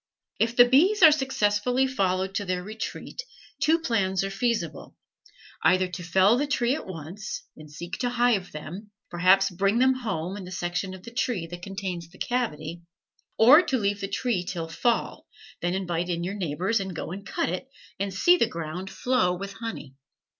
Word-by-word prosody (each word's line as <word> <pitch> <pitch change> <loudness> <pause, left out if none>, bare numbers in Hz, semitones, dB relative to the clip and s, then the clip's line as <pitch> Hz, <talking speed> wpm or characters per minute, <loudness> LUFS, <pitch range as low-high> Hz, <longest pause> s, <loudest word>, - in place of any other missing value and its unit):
If 230 +1 +1
the 245 - +8
bees 355 +11 +4
are 315 - +11
successfully 250 -3 +1
followed 190 -6 0
to 205 +1 -2
their 180 -1 -2
retreat, 220 - -6 0.4
two 320 +2 +4
plans 195 - 0
are 195 - -3
feasible: 195 - -2 0.7
either 185 0 +4
to 180 0 -6
fell 190 +6 +4
the 290 - 0
tree 245 -3 +1
at 305 - -5
once, 185 +4 -6
and 155 -1 -13
seek 170 +4 -7
to 245 - 0
hive 240 -6 +1
them, 175 +8 -8 0.2
perhaps 185 +3 +4
bring 195 +4 +1
them 260 +1 +5
home 200 -7 -3
in 200 - -7
the 180 - -9
section 180 +1 -3
of 185 - -13
the 235 - -9
tree 235 -7 -1
that 175 +1 -9
contains 185 -3 -5
the 185 - -18
cavity; 170 -10 -2 0.6
or 260 +9 +8
to 270 -7 0
leave 200 -2 -1
the 195 - -2
tree 200 -1 -1
till 170 -2 -4
fall, 230 +9 -1 0.3
then 175 +1 0
invite 175 -2 -2
your 175 +2 -2
neighbors, 190 +3 -1
and 190 -3 -5
go 160 - -5
and 200 +2 -7
cut - - -1
it, 185 +10 -4 0.3
and 200 0 -1
see 350 - +4
the 235 - +3
ground 170 +3 -5
flow 190 -9 +1
with 200 +2 -6
honey. 225 - -7
195 Hz, 180 wpm, -26 LUFS, 180-235 Hz, 0.7 s, are